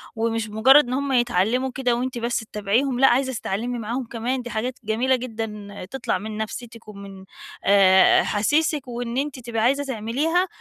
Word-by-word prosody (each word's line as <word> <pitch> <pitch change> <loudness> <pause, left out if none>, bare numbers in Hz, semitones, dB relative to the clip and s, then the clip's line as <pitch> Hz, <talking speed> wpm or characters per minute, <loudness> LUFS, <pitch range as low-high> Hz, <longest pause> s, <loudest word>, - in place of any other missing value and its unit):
ومش 225 -1 -1
مُجرّد 260 +6 +5
إن 250 - -3
هم 280 +1 -1
يتعلّموا 245 +1 +1
كده 245 -3 +1
وأنتِ 255 +1 -3
بس 235 +1 -1
تتابعيهم، 225 +5 -1
لأ، 270 - +6
عايزة 260 +1 +2
تتعلّمي 235 +3 -3
معاهم 235 +3 -3
كمان، 240 +3 -3
دي 245 - -8
حاجات 245 +4 -3
جميلة 240 +5 +1
جدًا 225 -4 -6 0.2
تطلع 265 -7 -2
من 215 +2 -7
نفسيتِك 230 +1 -7
ومن 200 -2 -11 0.4
آآ 190 -2 +5
أحاسيسِك 290 +6 0
وإن 240 0 -4
أنتِ 280 -2 -2
تبقي 230 -2 -3
عايزة 275 +4 +2
تعمليها، 275 - -1
240 Hz, 165 wpm, -23 LUFS, 220-260 Hz, 0.4 s, لأ